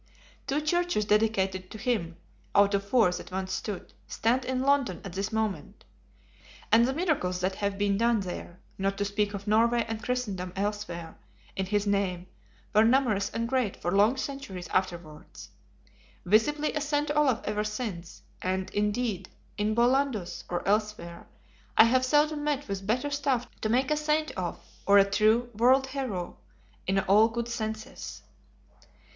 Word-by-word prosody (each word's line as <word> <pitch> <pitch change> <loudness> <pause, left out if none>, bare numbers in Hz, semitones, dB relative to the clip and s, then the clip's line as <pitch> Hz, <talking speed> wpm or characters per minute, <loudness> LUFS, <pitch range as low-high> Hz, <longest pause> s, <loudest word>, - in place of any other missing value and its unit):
Two 285 +2 0
churches 345 -7 +1
dedicated 195 -3 +1
to - - -8
him 210 -8 -2 0.4
(out 200 0 +5
of 200 0 +1
four 210 -2 +3
that 180 - -6
once 190 0 -3
stood) 205 -4 -5
stand 245 +3 0
in 260 0 -1
London 275 -10 +2
at 190 - -7
this 195 +3 -3
moment. 220 -3 -3 0.9
And 230 +2 +6
the 265 - 0
miracles 290 - 0
that 185 +1 0
have 200 -1 -2
been 200 0 +1
done 230 -2 +3
there, 180 -1 -7 0.2
not 195 +1 0
to 205 - 0
speak 205 0 -1
of 200 0 -7
Norway 230 +2 +3
and 225 -1 -4
Christendom 205 -7 -3
elsewhere, 195 -5 -4 0.4
in 190 -1 -2
his 205 +1 0
name, 195 -3 0 0.5
were 215 +1 +6
numerous 225 -5 +2
and 230 0 -2
great 250 -5 0
for 175 - -2
long 210 +7 +4
centuries 265 -11 -5
afterwards. 175 -5 -4 0.8
Visibly 295 +10 +2
a 300 - -1
Saint 295 0 0
Olaf 275 -6 +3
ever 210 0 -1
since; 210 -6 -5 0.2
and, 185 +1 -2
indeed, 210 -2 -1 0.3
in 215 +1 0
Bollandus 240 -5 +1
or 175 +1 -3
elsewhere, 210 -5 -1 0.5
I - - +10
have 255 +3 +3
seldom 295 +2 +2
met 290 -1 -1
with 195 -1 -5
better 250 +6 0
stuff 275 -4 0
to 215 - -1
make 255 +5 +2
a 300 - +2
Saint 305 +1 0
of, 180 -2 -4 0.3
or 200 0 +7
a 195 - +7
true 220 +4 +2
World 255 +5 +4
Hero 260 -10 -4 0.5
in 195 +1 +1
all 205 +3 +5
good 235 0 -3
senses. 220 0 -5
215 Hz, 160 wpm, -28 LUFS, 195-255 Hz, 0.9 s, I